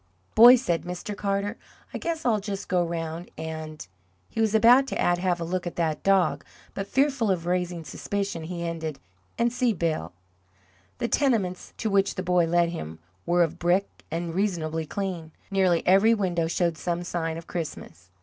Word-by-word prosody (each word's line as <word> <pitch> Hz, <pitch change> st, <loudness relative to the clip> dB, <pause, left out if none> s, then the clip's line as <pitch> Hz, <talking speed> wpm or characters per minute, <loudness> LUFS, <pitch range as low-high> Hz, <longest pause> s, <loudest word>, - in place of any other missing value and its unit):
"Boy," 240 Hz, +3 st, +10 dB
said 175 Hz, -10 st, 0 dB
Mr. 180 Hz, +3 st, -6 dB
Carter, 200 Hz, +2 st, -2 dB, 0.4 s
"I -, -, -4 dB
guess 330 Hz, -1 st, -3 dB
I'll 225 Hz, -4 st, +3 dB
just 200 Hz, -1 st, -5 dB
go 180 Hz, -1 st, +2 dB
round 165 Hz, 0 st, -4 dB
and" 160 Hz, -, -6 dB, 0.4 s
he 225 Hz, -, -2 dB
was 220 Hz, -1 st, +2 dB
about 245 Hz, +5 st, +6 dB
to -, -, -4 dB
add, 175 Hz, 0 st, +2 dB
"have 180 Hz, -1 st, 0 dB
a -, -, -3 dB
look 180 Hz, +1 st, -2 dB
at 175 Hz, -, -5 dB
that 160 Hz, -3 st, -1 dB
dog," 195 Hz, -4 st, +2 dB, 0.3 s
but 195 Hz, 0 st, -4 dB
fearful 265 Hz, -4 st, +1 dB
of 175 Hz, -3 st, 0 dB
raising 175 Hz, -1 st, -1 dB
suspicion, 195 Hz, +3 st, -4 dB
he 170 Hz, 0 st, -5 dB
ended 160 Hz, -3 st, -4 dB, 0.4 s
"and 235 Hz, 0 st, +1 dB
see 250 Hz, -2 st, +2 dB
Bill." 160 Hz, -, -2 dB, 0.9 s
The 235 Hz, -, -1 dB
tenements 225 Hz, -11 st, 0 dB
to 220 Hz, -, -2 dB
which 195 Hz, 0 st, +2 dB
the 185 Hz, -, -3 dB
boy 180 Hz, -1 st, +3 dB
led 170 Hz, 0 st, +3 dB
him 80 Hz, -, -6 dB, 0.3 s
were 175 Hz, 0 st, +4 dB
of 165 Hz, -, -3 dB
brick, 180 Hz, +3 st, +2 dB, 0.2 s
and 165 Hz, +1 st, -3 dB
reasonably 165 Hz, -5 st, -1 dB
clean. 175 Hz, -5 st, -4 dB, 0.2 s
Nearly 185 Hz, -3 st, +2 dB
every 195 Hz, +5 st, +5 dB
window 175 Hz, -5 st, 0 dB
showed 170 Hz, -1 st, 0 dB
some 175 Hz, 0 st, -2 dB
sign 165 Hz, -2 st, -3 dB
of 165 Hz, -, -9 dB
Christmas. 95 Hz, -, -6 dB
180 Hz, 180 wpm, -26 LUFS, 165-200 Hz, 0.9 s, Boy